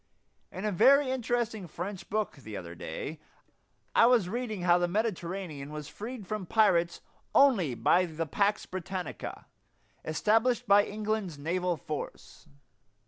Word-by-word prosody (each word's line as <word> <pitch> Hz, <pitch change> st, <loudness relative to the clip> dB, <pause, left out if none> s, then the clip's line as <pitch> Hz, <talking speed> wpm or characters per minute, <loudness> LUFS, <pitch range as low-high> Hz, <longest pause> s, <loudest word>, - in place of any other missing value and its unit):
In 190 Hz, -, -5 dB
a 210 Hz, -, +1 dB
very 260 Hz, +8 st, +5 dB
interesting 235 Hz, -5 st, -1 dB
French 180 Hz, +4 st, -6 dB
book 215 Hz, -6 st, -1 dB
the 110 Hz, -6 st, -8 dB
other 85 Hz, -2 st, -7 dB
day 85 Hz, -, -6 dB, 0.7 s
I 230 Hz, -, +6 dB
was 240 Hz, -7 st, +4 dB
reading 220 Hz, -4 st, -3 dB
how 175 Hz, 0 st, +5 dB
the 175 Hz, -, +1 dB
Mediterranean 180 Hz, -7 st, -3 dB
was 150 Hz, -1 st, -6 dB
freed 220 Hz, +7 st, -7 dB
from 210 Hz, -2 st, -4 dB
pirates 175 Hz, -6 st, +3 dB, 0.3 s
only 200 Hz, -, +5 dB
by 180 Hz, +8 st, +3 dB
the 165 Hz, 0 st, -3 dB
"pax 200 Hz, +6 st, +1 dB
Britannica," 185 Hz, 0 st, -6 dB, 0.6 s
established 225 Hz, +8 st, +1 dB
by 205 Hz, 0 st, +6 dB
England's 210 Hz, -5 st, -3 dB
naval 175 Hz, +3 st, -1 dB
force. 150 Hz, -1 st, -7 dB
190 Hz, 135 wpm, -30 LUFS, 170-220 Hz, 0.7 s, I